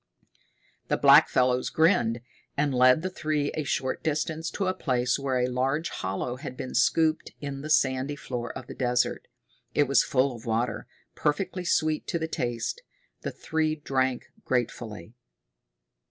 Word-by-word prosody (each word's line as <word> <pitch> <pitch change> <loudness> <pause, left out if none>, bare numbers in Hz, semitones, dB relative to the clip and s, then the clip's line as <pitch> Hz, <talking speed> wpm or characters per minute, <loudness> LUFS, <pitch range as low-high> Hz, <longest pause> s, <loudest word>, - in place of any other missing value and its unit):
The - - +1
blackfellows 125 0 +5
grinned, 120 - +3 0.4
and 145 -1 +1
led 130 +5 +5
the 185 - -1
three 155 -4 -1
a 155 - -2
short 130 -1 -2
distance 160 +1 -1
to 195 - -2
a 185 - +1
place 125 -6 0
where 135 -2 0
a 125 - +2
large 130 +6 0
hollow 95 +6 -3
had 130 -2 -8
been 130 0 -5
scooped 155 +5 +2
in 140 -1 -5
the 155 - -6
sandy 135 -1 +2
floor 125 -4 -5
of 130 - -9
the - - -8
desert. 125 -1 0 0.5
It 145 - +5
was 140 0 +4
full 130 -1 +1
of 115 0 -11
water, 115 0 -1 0.3
perfectly 180 +4 -1
sweet 155 -2 +1
to - - -1
the 160 -1 -2
taste. 120 - -3 0.4
The - - -3
three 155 -1 -1
drank 130 -4 -1 0.2
gratefully. 110 -5 -3
135 Hz, 155 wpm, -27 LUFS, 125-155 Hz, 0.5 s, blackfellows